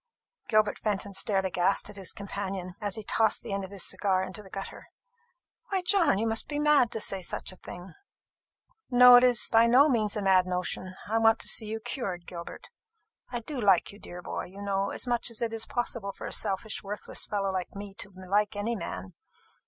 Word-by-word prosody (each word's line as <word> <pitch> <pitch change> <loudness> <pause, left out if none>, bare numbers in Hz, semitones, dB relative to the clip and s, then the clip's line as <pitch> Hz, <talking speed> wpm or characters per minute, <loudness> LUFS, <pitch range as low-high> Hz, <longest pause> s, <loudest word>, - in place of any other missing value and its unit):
Gilbert 215 -1 +2
Fenton 200 -1 -2
stared 195 0 0
aghast 185 +1 +1
at - - -14
his 195 -3 -2
companion, 195 -2 -5
as 205 -2 -1
he 220 - -5
tossed 220 +1 +1
the 215 - -5
end 195 0 -2
of 190 - -7
his 200 -2 +1
cigar 190 -2 +1
into 190 +3 -7
the 195 - -15
gutter. 195 +1 -7 0.8
"Why, 385 -2 -1
John, 355 - +4
you 220 - 0
must 225 0 -1
be 295 - -4
mad 295 -5 +4
to 225 - -2
say 195 -2 0
such 180 - -3
a - - -12
thing." 180 0 -10 1.0
"No, 250 -1 +9
it 245 - +5
is 245 -3 +3
by 225 +1 +6
no 260 +5 +6
means 220 -4 +1
a 205 - -2
mad 185 -1 +4
notion. 185 +1 -3
I 225 +2 +1
want 225 0 +5
to - - -4
see 220 - +1
you 220 +1 -3
cured, 190 -7 -4
Gilbert. 170 -1 -9 0.6
I 240 -1 -4
do 265 +2 -5
like 195 -5 +3
you, 205 - -14
dear 175 0 -10
boy, - - -4
you 195 +3 -10
know, 195 0 0
as - - -2
much 240 -1 +2
as 230 - -6
it 230 -1 -2
is 225 0 -2
possible 235 -5 -2
for - - -9
a - - -2
selfish 205 +1 0
worthless 205 +1 -3
fellow 200 -2 -1
like 185 0 -4
me 200 0 -7
to 200 - -4
like 195 +3 -1
any 215 +3 -2
man. 95 - -6
205 Hz, 215 wpm, -28 LUFS, 190-225 Hz, 1.0 s, No